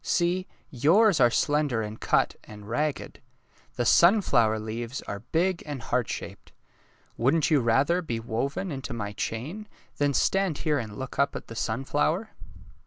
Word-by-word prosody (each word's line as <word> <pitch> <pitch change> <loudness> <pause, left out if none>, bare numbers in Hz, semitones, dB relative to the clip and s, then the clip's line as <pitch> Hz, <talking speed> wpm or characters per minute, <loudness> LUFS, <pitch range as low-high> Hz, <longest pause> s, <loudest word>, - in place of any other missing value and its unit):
See, 180 +1 0 0.2
yours 170 - +4
are 120 -2 +6
slender 145 -2 +1
and 105 +1 -7
cut - - +2
and 105 -1 -12
ragged. 145 +5 -3 0.5
The 120 - 0
simflower 145 - +4
leaves 115 +4 -5
are 100 - -5
big 170 - 0
and 145 -2 -4
heart 120 0 -1
shaped. - - -7 0.7
Wouldn't 150 +6 +2
you 150 - +5
rather 135 +9 +2
be 120 -9 -3
woven 130 +10 -3
into 135 -2 -5
my 105 -3 -4
chain 145 - -5 0.3
than 145 -1 +1
stand 190 -6 +1
here 150 -2 0
and 110 -3 -7
look 130 0 -6
up 140 - +2
at - - -7
the 115 - -8
sunflower? 145 - -1
140 Hz, 155 wpm, -27 LUFS, 115-165 Hz, 0.7 s, are